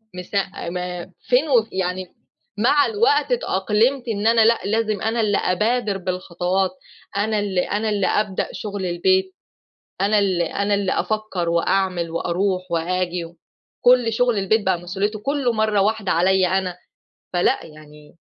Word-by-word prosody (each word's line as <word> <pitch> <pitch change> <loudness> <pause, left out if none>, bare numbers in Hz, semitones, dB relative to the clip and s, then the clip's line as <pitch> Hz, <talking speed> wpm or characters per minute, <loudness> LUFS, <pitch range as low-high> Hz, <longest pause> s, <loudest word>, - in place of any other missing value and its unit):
مست 180 +3 -8
أ 195 -3 -2
ما 180 0 -4 0.2
فين 265 +5 +1
و 235 -5 +4
يعني 185 0 -2 0.5
مع 285 +6 +4
الوقت 435 +2 +2
اتأقلمت 240 - +1
إن 215 -1 -1
أنا 230 -1 +5
لأ 230 0 +4
لازم 215 -1 0
أنا 225 +1 0
اللي 205 -2 +2
أبادر 210 +2 0
بالخطوات، 185 0 -1 0.5
أنا 215 +1 +1
اللي 195 -3 0
أنا 210 +4 -1
اللي 205 -2 +1
أبدأ 210 -3 0
شغل 205 -3 -5
البيت، 375 - +1 0.7
أنا 210 +1 +3
اللي 185 -4 +1
أنا 200 +1 -1
اللي 200 -2 0
أفكّر 215 -6 -2
وأعمل 170 0 0
وأروح 185 +2 -1
وآجي، 175 +1 -1
و 170 +1 -14 0.5
كل 245 -2 +5
شغل 245 -2 +2
البيت 205 +2 +1
بقى 185 -2 +1
مسؤوليته 200 +4 -3
كلّه 275 +1 0
مرّة 215 -2 +1
واحدة 215 -1 0
عليَّا 185 +2 +3
أنا، 180 -2 -3 0.6
فلأ 175 0 +2
يعني 150 0 -15
200 Hz, 150 wpm, -21 LUFS, 180-220 Hz, 0.7 s, أنا